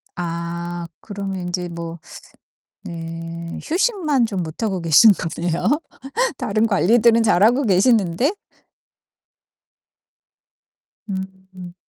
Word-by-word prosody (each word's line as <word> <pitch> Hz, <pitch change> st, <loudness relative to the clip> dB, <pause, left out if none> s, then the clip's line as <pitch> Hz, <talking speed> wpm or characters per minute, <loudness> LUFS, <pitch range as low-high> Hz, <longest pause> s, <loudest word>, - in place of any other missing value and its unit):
아 170 Hz, 0 st, -4 dB
그러면 195 Hz, -2 st, -5 dB
인제 180 Hz, 0 st, -3 dB
뭐 170 Hz, 0 st, -7 dB, 0.8 s
네. 165 Hz, 0 st, -7 dB
휴식만 330 Hz, -, +1 dB
좀 190 Hz, -5 st, -3 dB
못 160 Hz, +6 st, -8 dB
하고 195 Hz, -4 st, -1 dB
계신 165 Hz, +6 st, +7 dB
거네요 175 Hz, -, -1 dB, 0.6 s
다른 215 Hz, +2 st, +1 dB
관리들은 230 Hz, +3 st, +4 dB
잘하고 225 Hz, +7 st, +4 dB
계시는데? 215 Hz, -, +2 dB, 2.7 s
음. 190 Hz, -2 st, -8 dB
190 Hz, 170 characters per minute, -21 LUFS, 170-225 Hz, 2.7 s, 계신